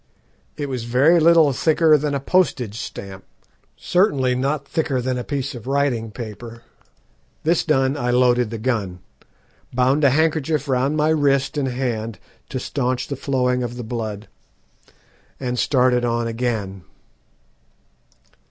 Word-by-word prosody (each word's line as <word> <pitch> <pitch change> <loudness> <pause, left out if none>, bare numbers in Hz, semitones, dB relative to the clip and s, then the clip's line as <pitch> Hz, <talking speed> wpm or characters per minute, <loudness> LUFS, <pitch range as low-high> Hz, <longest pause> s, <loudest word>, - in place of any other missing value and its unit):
It 145 - -3
was 125 -4 -4
very 140 +9 +4
little 160 -3 +5
thicker 160 +3 +3
than 145 -1 0
a - - 0
postage 140 - +1
stamp; 95 -1 -8 0.5
certainly 145 -9 +2
not 135 +2 -1
thicker 150 -5 -1
than 130 +1 -1
a 125 - -3
piece 140 0 -3
of 120 -1 -10
writing 135 -5 0
paper. 115 +1 -9 0.8
This 165 +2 +2
done, 135 -3 +1
I 125 -4 -2
loaded 125 -1 +3
the 115 - -5
gun, 110 -6 -2 0.7
bound 130 +4 +2
a 140 - +6
handkerchief 155 0 +1
round 135 +3 +1
my 150 +1 +2
wrist 145 -2 +1
and 145 -2 0
hand 120 -4 -3 0.3
to 130 - -3
staunch 130 -1 -2
the 140 - -2
flowing 125 -2 0
of 120 0 -4
the 120 - -5
blood, 110 -2 -5 1.1
and 125 -2 -3
started 125 -2 +2
on 120 -1 0
again. 115 -5 -3
130 Hz, 140 wpm, -21 LUFS, 120-145 Hz, 1.1 s, a